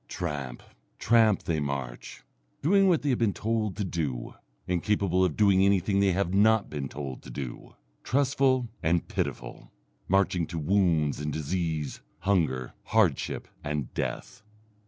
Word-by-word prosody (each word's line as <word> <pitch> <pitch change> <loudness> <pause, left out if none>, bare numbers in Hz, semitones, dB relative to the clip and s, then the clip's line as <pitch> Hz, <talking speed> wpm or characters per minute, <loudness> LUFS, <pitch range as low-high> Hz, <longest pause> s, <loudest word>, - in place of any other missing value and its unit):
Tramp, 70 -8 -5 0.3
tramp, 110 -4 +3
they 80 -2 -1
march, 70 -4 -5 0.4
doing 195 +5 +4
what 170 -5 +2
they 145 - 0
have 125 - +1
been 110 -4 +1
told 110 -3 -1
to 105 - -1
do, 75 -10 -3 0.3
incapable 95 +1 +1
of 90 -5 0
doing 100 -3 +4
anything 100 0 +2
they 100 -1 +3
have 90 0 0
not 110 +1 +3
been 70 -3 -4
told 70 -3 -6
to - - -12
do, 60 0 -7 0.3
trustful 135 -2 +2
and 85 0 +1
pitiful, - - -4 0.4
marching 95 -3 +2
to 85 - -6
wounds 80 -4 +2
and 75 0 -3
disease, 80 -1 -3 0.2
hunger, 80 -11 0
hardship, 105 -10 +1 0.2
and 75 -3 -3
death. 125 -1 -4
90 Hz, 140 wpm, -28 LUFS, 75-105 Hz, 0.4 s, doing